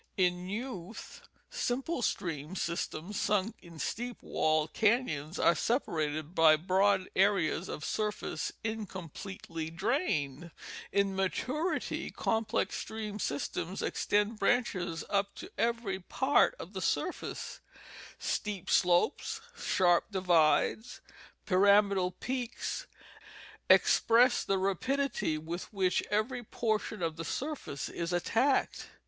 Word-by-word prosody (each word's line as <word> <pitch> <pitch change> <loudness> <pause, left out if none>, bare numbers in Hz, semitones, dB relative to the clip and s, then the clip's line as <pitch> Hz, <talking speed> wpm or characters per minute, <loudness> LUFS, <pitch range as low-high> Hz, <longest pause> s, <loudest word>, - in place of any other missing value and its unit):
In 180 -1 +1
youth 220 -3 -6 0.3
simple 275 - -1
stream 165 -5 -2
systems 170 +2 -3
sunk 210 +1 +1
in 170 -2 -13
steep 240 +8 -4
walled 155 0 +1
canons 205 - +1
are 170 - +5
separated 155 - -1
by 160 -3 +7
broad 190 +3 +2
areas 190 -3 +2
of 150 - -5
surface 210 -1 -2
incompletely 190 -5 -5
drained. 170 - -1 0.4
In 200 -1 +1
maturity 255 - -1
complex 225 -1 -1
stream 215 -1 -5
systems 165 +3 -3
extend 210 +2 0
branches 195 -7 +1
up 200 0 0
to 370 - -9
every 230 -5 0
part 265 - +2
of - - -9
the - - -4
surface; - - -2 0.6
steep 205 -4 -3
slopes, 180 - +2 0.2
sharp 175 - +3
divides, 185 +4 +2 0.5
pyramidal 200 -1 +4
peaks 250 - -4 0.8
express 240 +2 +5
the 195 - +1
rapidity 195 - 0
with 165 +3 -6
which 190 -3 +1
every 215 +5 0
portion 215 -3 -2
of 165 -1 -1
the 165 - -4
surface 260 - -4
is 170 +1 -4
attacked. 230 +10 +1
195 Hz, 105 wpm, -31 LUFS, 170-230 Hz, 0.8 s, by